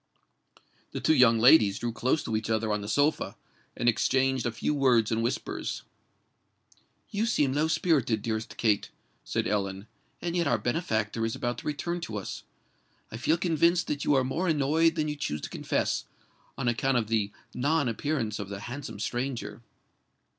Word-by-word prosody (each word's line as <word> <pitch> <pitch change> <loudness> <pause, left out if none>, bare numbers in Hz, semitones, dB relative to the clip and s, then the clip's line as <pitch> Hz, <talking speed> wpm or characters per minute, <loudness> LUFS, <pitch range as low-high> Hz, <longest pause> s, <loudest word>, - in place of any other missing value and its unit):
The - - -3
two - - +3
young 115 -6 +6
ladies 110 -4 +6
drew 120 -1 -2
close 130 +6 0
to 110 - -2
each 110 0 -2
other 110 -1 0
on 105 - -1
the 100 - -6
sofa, 145 +7 +1 0.4
and 120 - -1
exchanged 130 +2 +2
a - - -1
few 115 +6 -1
words 125 -6 +3
in 115 0 +1
whispers. 115 - -3 1.3
"You 210 +3 0
seem 145 - +2
low 150 +3 +2
spirited, 135 - +1
dearest 110 -1 -3
Kate," 105 -3 +1 0.3
said - - -1
Ellen; 100 -1 -2 0.3
"and 175 0 -3
yet 170 -3 +1
our 120 - +3
benefactor 115 - -1
is 115 0 -1
about 120 0 -2
to - - -8
return 170 +4 -2
to 110 -10 -4
us. 100 - -5 0.7
I 110 - -5
feel 155 +7 +2
convinced 170 0 +2
that 145 -1 -2
you 145 - +3
are 130 - +3
more 135 +9 -1
annoyed 160 +2 +3
than 155 -2 0
you 150 - -2
choose 75 - -3
to - - -6
confess, - - -1 0.5
on - - -2
account 125 +2 +2
of 115 - +1
the, 105 -2 0 0.2
non 145 +3 +1
appearance 115 -2 -2
of 100 -1 -5
the 100 0 -6
handsome 120 -3 -7
stranger." 120 -2 -3
125 Hz, 175 wpm, -28 LUFS, 110-150 Hz, 1.3 s, young